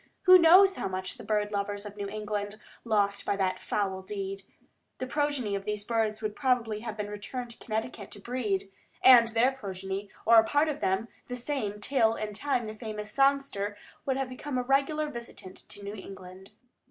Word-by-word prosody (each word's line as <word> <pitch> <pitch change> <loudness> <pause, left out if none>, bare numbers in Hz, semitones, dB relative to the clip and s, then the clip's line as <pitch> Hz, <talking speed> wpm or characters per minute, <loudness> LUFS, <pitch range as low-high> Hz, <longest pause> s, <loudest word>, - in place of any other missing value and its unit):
Who 370 -1 +9
knows 375 +4 +7
how - - -2
much 185 0 -4
the - - -8
bird 210 -1 0
lovers 205 0 -2
of 205 0 -8
New 200 -1 -4
England 210 0 -4 0.2
lost 205 -3 +1
by - - 0
that 190 -2 0
foul 190 -2 -2
deed? 195 0 -5 0.6
The 255 - -3
progeny 285 -5 -1
of 200 0 -2
the 210 0 -1
birds 220 -2 0
would 210 -1 -2
probably 245 -6 +1
have 220 -1 -6
returned 210 +4 -5
to 235 - -13
Connecticut 220 +2 -4
to 205 - -8
breed, 205 -4 -2 0.3
and 245 -3 +9
their 230 +3 +3
progeny, 195 -4 -5 0.2
or 230 0 +8
a - - +5
part 290 +7 +2
of 295 -1 -3
them, 190 +4 0 0.2
the 250 - -4
same, 235 -5 -3
till 225 -1 +2
in 210 -1 -4
time 245 +1 -1
the 215 - -5
famous 215 -1 -6
songster 275 -7 +1 0.3
would 265 -1 0
have 270 -1 -1
become 255 +1 -4
a 250 - 0
regular 280 +4 +1
visitant 235 -8 -9
to 205 - -9
New 200 +1 -5
England. 190 -1 -10
215 Hz, 190 wpm, -29 LUFS, 200-255 Hz, 0.6 s, Who